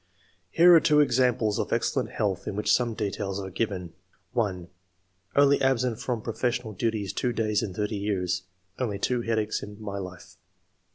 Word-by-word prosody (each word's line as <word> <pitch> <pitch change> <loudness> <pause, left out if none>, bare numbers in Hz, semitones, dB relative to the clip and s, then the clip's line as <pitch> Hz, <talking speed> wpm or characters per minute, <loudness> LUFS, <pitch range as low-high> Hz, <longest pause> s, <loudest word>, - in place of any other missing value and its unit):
Here 175 - +7
are 165 - +9
two 150 -1 +4
examples 125 -6 +2
of - - -2
excellent - - 0
health 100 -2 -2
in 100 - -3
which 105 - +2
some 120 -3 +1
details 100 -2 -3
are 95 -1 -6
given: 90 -5 -3 0.2
— 90 -1 -39
1. 95 -7 -1 0.3
" 95 0 -41
Only 140 0 +5
absent 125 -3 +1
from 125 -3 -3
professional 120 -1 -2
duties 105 -1 -2
two 125 - 0
days 110 -2 +1
in 95 -4 -4
thirty 105 +1 -2
years; 90 -3 -1 0.4
only 110 -6 -1
two 120 +4 0
headaches 110 -2 -1
in 105 0 -9
my 100 -2 -5
life.'' 90 -1 -9
105 Hz, 175 wpm, -27 LUFS, 95-120 Hz, 0.4 s, are